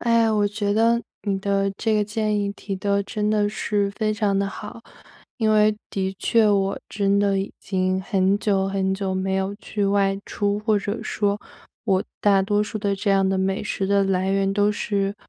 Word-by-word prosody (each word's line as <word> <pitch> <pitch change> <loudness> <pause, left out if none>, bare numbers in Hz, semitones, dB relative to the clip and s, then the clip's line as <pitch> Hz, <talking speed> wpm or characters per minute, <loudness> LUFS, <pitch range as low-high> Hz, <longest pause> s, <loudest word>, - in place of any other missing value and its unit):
哎 230 -1 +3
呀， 220 -1 +2
我 205 -1 +2
觉 205 -1 -1
得 230 +1 +3 0.2
你 200 -2 -1
的 195 0 0
这 220 0 0
个 210 -1 +2
建 210 0 -1
议 200 0 -2
提 200 -1 -6
得 200 +1 0
真 210 +1 -2
的 210 -1 +2
是 205 -1 -1
非 215 0 -1
常 210 -2 0
地 200 - +1
好。 210 +3 -8 0.6
因 220 -2 +2
为 215 0 +4
的 190 -1 -2
确 225 -2 +3
我 195 -1 +1
真 200 0 +1
的 200 -1 +2
已 195 - -3
经 185 -1 0
很 195 -1 +1
久 195 -2 +1
很 190 0 0
久 195 -1 -2
没 190 0 -1
有 190 +1 -1
去 205 -1 -3
外 195 0 +2
出， 205 0 -1
或 215 -1 +2
者 205 +2 -4
说， 205 -1 -1 0.5
我 190 -3 +1 0.2
大 200 -2 +4
多 205 +1 +1
数 215 +1 -4
的 200 -1 0
这 200 +1 -1
样 195 -1 +3
的 190 - +1
美 195 +3 0
食 200 -2 -2
的 200 0 +3
来 190 0 0
源 195 0 +1
都 205 +1 +2
是 200 -1 -1
200 Hz, 220 characters per minute, -23 LUFS, 195-210 Hz, 0.6 s, 为